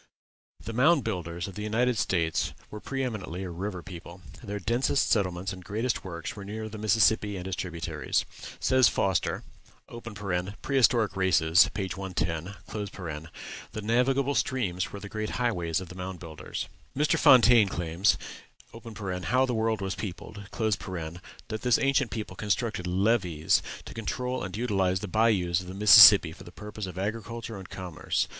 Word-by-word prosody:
The 115 - -6
Mound 140 +4 +4
Builders 85 -5 -3
of 100 - -8
the 105 - -7
United 115 +4 +1
States 85 -6 0 0.2
were 105 - -6
pre 135 +4 -3
eminently 95 -7 -4
a 90 - -5
river 90 +1 -5
people. 85 +1 -10 0.2
Their 105 -2 -4
densest 120 +7 +1
settlements 95 -2 0
and 90 0 -10
greatest 110 +6 -2
works 85 -3 -6
were 100 - -8
near 110 +2 -5
the 110 0 -8
Mississippi 105 -1 +2
and 90 - -6
its 95 - -3
tributaries. 85 -3 -2 0.3
Says 130 -2 +4
Foster 95 -2 0 1.2
("Prehistoric 120 -5 +3
Races," 90 -2 +4
p. 95 -2 -2
110), 90 -1 -3 1.2
"The 110 - -4
navigable 130 +5 +2
streams 95 -11 -1
were 100 - -7
the 100 - -8
great 110 +1 -4
highways 90 -10 0
of 95 -2 -8
the - - -9
Mound 90 0 -6
Builders." 80 -2 -6 0.3
Mr. 150 +1 +2
Fontaine 120 -5 +7
claims 85 +3 +1 1.1
("How 130 +5 +3
the 125 - -2
World 110 -2 0
was 95 -1 -2
Peopled") 100 0 -7
that 95 0 -4
this 125 -2 +3
ancient 135 -2 +2
people 105 -4 -5
constructed 105 -2 -1
"levees" 90 -4 +2 0.2
to - - -9
control 125 +3 -3
and 95 +2 -5
utilize 95 -5 0
the 105 - -4
bayous 95 -4 +2
of 90 - -11
the 95 - -7
Mississippi 105 -3 +9
for - - -12
the 90 - -12
purpose 105 +1 -7
of 90 -1 -8
agriculture 115 +3 -4
and 95 - -11
commerce. 85 -4 -2
100 Hz, 155 wpm, -28 LUFS, 90-115 Hz, 1.2 s, Mississippi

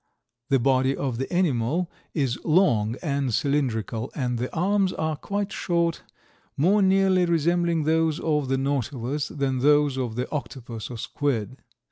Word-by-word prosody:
The 135 - +4
body 130 +1 +2
of 125 -4 -2
the 135 - -3
animal 165 -1 0 0.2
is 135 -6 -1
long 120 - +3
and 140 -4 -1
cylindrical 120 -3 -1
and 125 -4 -1
the 125 - -3
arms 190 +2 +1
are 155 0 -1
quite 200 +6 -3
short, 170 -2 0 0.6
more 190 +8 +4
nearly 190 -1 +4
resembling 170 0 +1
those 160 0 +1
of 150 -3 0
the 135 +1 +1
Nautilus 135 0 -2
than 135 -3 -2
those 145 0 +3
of 120 -4 -3
the 125 - -2
Octopus 120 -6 -5
or 120 - -6
squid. 130 -1 -2
145 Hz, 145 wpm, -25 LUFS, 125-170 Hz, 0.6 s, The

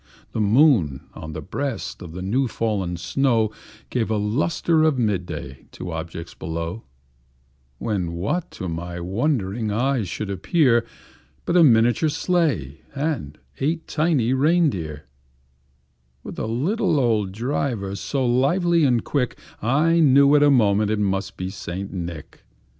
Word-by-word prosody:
The 110 - -2
moon, 105 - +3
on 80 0 -8
the 80 0 -6
breast 135 - -4
of 85 -3 -9
the 90 +1 -6
new 125 +8 +1
fallen 100 -6 -2
snow, 110 +4 +1 0.4
Gave 115 -3 0
a 110 - +1
lustre 150 +9 +1
of 155 -3 +3
mid 105 -7 0
day 65 0 -8
to 90 - -6
objects 80 +1 -6
below; 85 +6 -5 0.9
When, 90 - -2
what 115 - -2
to 95 - -5
my 85 +1 -5
wondering 105 - -1
eyes 120 -2 0
should 100 +3 -4
appear, 120 - +2 0.6
But 170 - 0
a 175 - +7
miniature 120 +3 +4
sleigh, 145 - 0
and 135 - -2 0.2
eight 160 +4 -1
tiny 150 -7 +1
rein 155 +4 +3
deer, 75 -6 -6 1.2
With - - -7
a - - -2
little 165 - +1
old 110 -6 +1
driver, 115 -3 -2
so 130 +6 -2
lively 165 +8 +2
and 120 -4 +2
quick, 130 -5 -1 0.2
I 155 +9 +3
knew 140 -2 +6
in 145 - +5
a 145 - +6
moment 105 -5 +3
it 110 - +1
must 95 -1 -1
be 95 +1 -4
St. 95 0 -6
Nick. 85 -4 -7
115 Hz, 145 wpm, -23 LUFS, 95-140 Hz, 1.2 s, a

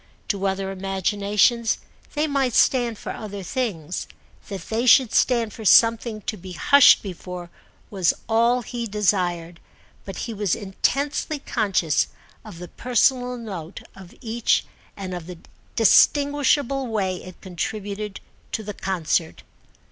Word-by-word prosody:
To 200 -1 0
other 195 0 -2
imaginations 200 +4 +1 0.4
they 300 +1 +1
might 275 -5 0
stand 240 -4 +3
for - - -6
other 205 -3 -7
things—that 190 - -5
they 225 +8 -2
should 250 -1 +6
stand 235 -4 +2
for 225 - -9
something 230 +1 +4
to 215 - -4
be 185 0 -9
hushed 280 - +6
before 180 -2 -8 0.4
was 185 -4 +2 0.2
all 235 +2 +2
he 235 0 -5
desired; 180 -5 -1 0.4
but 195 - -8
he 230 - -5
was 205 -4 0
intensely 275 +9 -1
conscious 195 - 0 0.4
of - - -11
the 180 +1 -8
personal 250 +3 +1
note 190 -7 -7
of 190 -2 -13
each 230 -1 0 0.3
and 190 -2 -5
of 175 -2 -6
the 180 -1 -8 0.4
distinguishable 280 +2 +3
way 195 -5 -1
it 185 0 -12
contributed 200 +3 -5 0.3
to 220 - -2
the 210 0 -6
concert. 175 -4 -2
210 Hz, 130 wpm, -23 LUFS, 185-235 Hz, 0.4 s, should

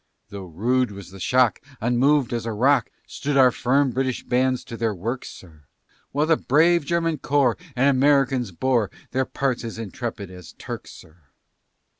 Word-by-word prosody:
Though 100 -2 -8
rude 120 +9 0
was 100 -3 -10
the 95 - -11
shock, 125 +1 +2 0.2
Unmov'd 125 +3 +2
as 115 -1 -3
a - - -1
rock, 125 +4 +2 0.2
Stood 140 0 -3
our 130 -2 +6
firm 135 +3 +1
British 130 +1 -2
bands 130 +1 0
to 115 - -8
their 115 -2 -1
works, 115 +8 -4
sir, 80 -5 -15 0.5
While 145 +2 +1
the 160 0 +3
brave 165 +5 +3
German 165 -1 0
corps, 135 -5 +2 0.2
And 130 +2 +3
Americans 135 -3 +3
bore 115 +2 0 0.2
Their 130 +1 0
parts 130 -3 -2
as 115 -1 -6
intrepid 110 -2 -6
as 90 -2 -12
Turks, - - -8
sir. 80 +1 -15
125 Hz, 165 wpm, -23 LUFS, 110-135 Hz, 0.5 s, our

